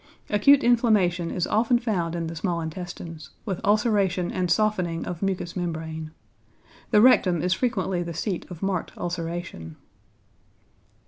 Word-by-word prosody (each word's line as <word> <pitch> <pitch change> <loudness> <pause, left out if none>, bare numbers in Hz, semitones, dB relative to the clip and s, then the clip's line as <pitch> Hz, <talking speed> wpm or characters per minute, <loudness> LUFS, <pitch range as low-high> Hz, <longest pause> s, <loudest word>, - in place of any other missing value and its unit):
Acute 265 +7 +5
inflammation 210 -8 +3
is 180 - -1
often 235 +3 +2
found 185 -8 -1
in 170 -1 -2
the 165 +1 -5
small 170 0 -1
intestines, 165 -1 -7 0.2
with 190 -4 -3
ulceration 205 -4 +2
and 180 -1 -1
softening 180 -4 +1
of 170 -2 -5
mucous 190 -3 -2
membrane. 160 -3 -4 0.8
The 210 - +5
rectum 185 -9 +5
is 180 - +2
frequently 190 -7 -1
the 170 -1 -5
seat 185 +1 -3
of 180 0 -8
marked 190 -3 -2
ulceration. 170 - -5
180 Hz, 135 wpm, -25 LUFS, 170-205 Hz, 0.8 s, Acute